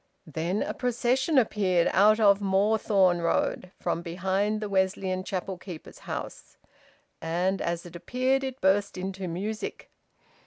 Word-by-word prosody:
Then 165 +5 -2
a - - -3
procession 250 +4 +1
appeared, 195 -7 +3
out 215 +3 +5
of 200 -2 +5
Moorthorne 195 -2 +3
Road, 180 +2 0
from 170 -1 -1
behind 190 +5 -1
the 210 - -3
Wesleyan 190 -1 0
Chapel 185 -1 -4
keeper's 180 -4 -10
house. - - -6 0.6
And 175 +4 0
as 170 0 -2
it 175 0 -11
appeared 255 +8 0
it 265 0 -5
burst 200 +1 +2
into 190 0 -4
music. 200 +6 -5
190 Hz, 130 wpm, -27 LUFS, 180-215 Hz, 0.6 s, out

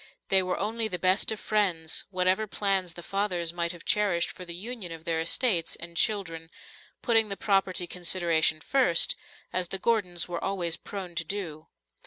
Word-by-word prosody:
They 190 -1 +5
were 185 0 -1
only 220 +2 0
the 185 -4 -3
best 185 +4 +3
of 220 - -3
friends, 180 -7 0
whatever 185 +3 +1
plans 195 -3 +1
the 175 - -10
fathers 180 -4 -1
might 170 -1 0
have 175 -2 -10
cherished 195 -5 +2
for 180 - -9
the 170 -1 -5
union 210 -1 -6
of 165 -1 -8
their 165 -2 0
estates 170 0 +1
and 170 0 -9
children, 165 -6 +1 0.5
putting 225 -3 +4
the 200 - -3
property 195 -3 +1
consideration 170 -3 +1
first, 250 - +3 0.4
as 185 -1 0
the 195 - -2
Gordons 190 -5 +1
were 175 -1 -4
always 180 -4 0
prone 190 -4 -7
to 170 0 -1
do. 160 -4 -5
185 Hz, 175 wpm, -28 LUFS, 170-200 Hz, 0.5 s, They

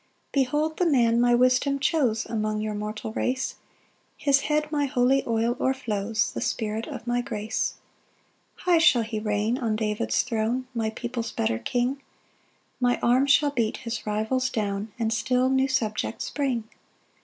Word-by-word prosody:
2 280 - +2
"Behold 300 +5 0
the 360 - +2
man 235 -5 +3
my 240 0 +4
wisdom 255 +3 +3
chose 265 -7 +1
"Among 215 -1 -2
your 215 0 -2
mortal 210 +1 -5
race; 260 +3 -1 0.6
"His 280 -2 +3
head 300 0 +1
my 290 -2 +1
holy 260 +1 +2
oil 230 +1 +1
o'erflows, 220 -5 -1
"The - - -4
Spirit 220 +1 -2
of 230 - -7
my 245 0 0
grace. 220 -2 -2 0.9
3 360 - +3
"High - - +7
shall 255 -7 +5
he 220 -1 -4
reign 210 +3 0
on 225 -3 0
David's 210 -1 0
throne, 240 +2 -1
"My 225 -2 -1
people's 235 +1 -4
better 110 0 -1
King; 255 - -1 0.8
"My 245 -1 +2
arm 255 +3 +4
shall 285 +1 +4
beat 230 -5 0
his 230 -2 -4
rivals 220 +5 0
down, 205 -2 -2
"And 225 -1 0
still 255 +2 +1
new 265 0 +3
subjects 230 -6 -2
bring. 265 -5 -1
240 Hz, 160 wpm, -26 LUFS, 220-265 Hz, 0.9 s, High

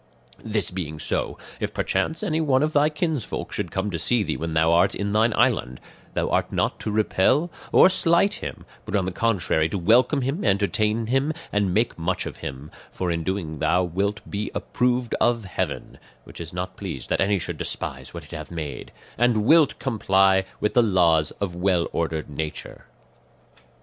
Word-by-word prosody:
"This 105 -4 0
being 80 -4 -5
so, - - -2 0.2
if - - -3
perchance 160 +6 -1
anyone 155 -7 +2
of 155 0 0
thy 145 +1 +4
kinsfolk 155 - -3
should - - -2
come 95 +2 -2
to 85 - -3
see 120 +5 +2
thee - - -2
when 80 0 -4
thou 80 +1 +4
art 90 +3 +3
in 100 0 -2
thine 110 +2 +3
island, 110 - +1 0.4
thou - - 0
art - - +1
not - - -1
to - - -4
repel 110 - +2 0.2
or - - +7
slight 185 +1 +3
him, - - -7 0.2
but - - -4
on 95 -3 +1
the 95 - -2
contrary 90 -6 +1
to 100 - -2
welcome 120 - +3
him, 140 +9 -2
entertain 105 +2 +1
him, 135 +6 +1 0.2
and 100 -2 +1
make 110 0 0
much 85 +3 -1
of - - -7
him; 70 +2 -7 0.2
for 90 -2 -3
in 85 - -1
so 80 - -6
doing 85 -5 -3
thou 90 +5 +2
wilt 100 +4 -1
be 105 +1 -3
approved 125 -1 0
of 115 -3 +2
heaven 95 - -4 0.2
(which - - -11
is 85 - -7
not 90 +1 -5
pleased 80 -10 -6
that - - +1
any 100 +1 +2
should 85 - -4
despise - - -5
what - - -8
it - - -16
hath - - -7
made), 80 -4 -6 0.3
and 120 -3 +3
wilt 155 +1 +5
comply 95 -6 +2
with 105 - 0
the 120 - +5
laws 85 -8 +3
of 95 -4 -3
well 90 -1 +1
ordered 80 -2 -2
nature. 75 +1 -6
100 Hz, 185 wpm, -24 LUFS, 85-120 Hz, 0.4 s, or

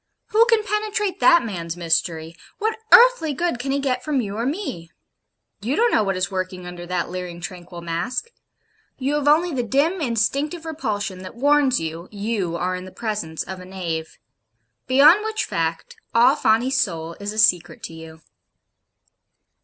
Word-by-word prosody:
Who 455 +1 +5
can 455 -2 +3
penetrate 420 -2 -1
that 340 - +5
man's 170 -5 -5
mystery? 165 -1 -1 0.2
What 440 +1 -2
earthly 480 -11 +7
good 340 -5 -1
can 270 +3 -4
he 275 - +1
get 260 -3 -1
from 300 -3 0
you 205 -4 -3
or 230 +3 -1
me? 275 - -4 0.7
You 240 +7 -1
don't 470 +4 +3
know 215 - +3
what 195 -2 -1
is 185 +1 -1
working 185 -1 -4
under 175 0 -8
that 180 -1 -2
leering 180 -1 -6
tranquil 175 -1 -8
mask. 170 - -3 0.7
You 275 +2 -1
have 295 -1 0
only 320 +3 +4
the 255 - 0
dim 285 - +1
instinctive 280 +7 -1
repulsion 215 - -3
that 185 +3 -9
warns 280 0 +3
you, 165 +2 -5
you 205 -4 -2
are 180 +2 -1
in 180 0 -7
the 185 - -10
presence 205 -9 -4
of 190 -1 -7
a 180 - -10
knave 170 -4 -5 0.7
beyond 300 +10 +6
which 440 0 -2
fact 165 0 -3 0.2
all 245 +4 +6
Fawney's 240 0 +2
soul 165 -2 -3
is 205 0 -4
a 215 - -9
secret 180 -6 +2
to - - -6
you. 160 0 -11
220 Hz, 170 wpm, -22 LUFS, 180-295 Hz, 0.7 s, earthly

